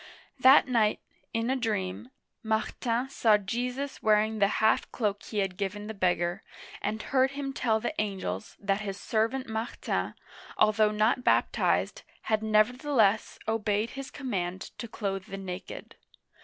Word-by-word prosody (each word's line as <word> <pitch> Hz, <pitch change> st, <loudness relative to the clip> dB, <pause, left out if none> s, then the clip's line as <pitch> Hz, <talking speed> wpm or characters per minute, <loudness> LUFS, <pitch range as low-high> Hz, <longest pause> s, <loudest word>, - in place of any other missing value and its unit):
That 260 Hz, +3 st, +7 dB
night, 225 Hz, -4 st, +2 dB, 0.3 s
in 230 Hz, +2 st, 0 dB
a -, -, +2 dB
dream, 215 Hz, -3 st, -2 dB, 0.3 s
Martin 230 Hz, +2 st, -1 dB
saw 225 Hz, -6 st, +4 dB
Jesus 245 Hz, +7 st, -3 dB
wearing 215 Hz, 0 st, +3 dB
the 200 Hz, -, +5 dB
half 220 Hz, 0 st, +2 dB
cloak 205 Hz, -4 st, -1 dB
he 215 Hz, -, -7 dB
had 195 Hz, -2 st, 0 dB
given 205 Hz, +1 st, -3 dB
the 220 Hz, -, -5 dB
beggar, 180 Hz, -1 st, 0 dB, 0.4 s
and 215 Hz, +2 st, -2 dB
heard 265 Hz, +3 st, +1 dB
him 275 Hz, -1 st, -3 dB
tell 225 Hz, -4 st, +1 dB
the 240 Hz, +7 st, -2 dB
angels 185 Hz, -, -4 dB
that 200 Hz, +1 st, 0 dB
his 200 Hz, -1 st, -5 dB
servant 230 Hz, +6 st, 0 dB
Martin, 220 Hz, +1 st, -3 dB, 0.4 s
although 215 Hz, 0 st, +4 dB
not 215 Hz, +4 st, +1 dB
baptized, -, -, +2 dB, 0.2 s
had 215 Hz, -1 st, +1 dB
nevertheless 220 Hz, 0 st, +2 dB
obeyed 215 Hz, 0 st, 0 dB
his 275 Hz, 0 st, -7 dB
command 190 Hz, -8 st, -4 dB
to 235 Hz, -, -5 dB
clothe 195 Hz, -3 st, -3 dB
the 195 Hz, -, -7 dB
naked. 190 Hz, -1 st, -7 dB
215 Hz, 140 wpm, -29 LUFS, 200-240 Hz, 0.4 s, That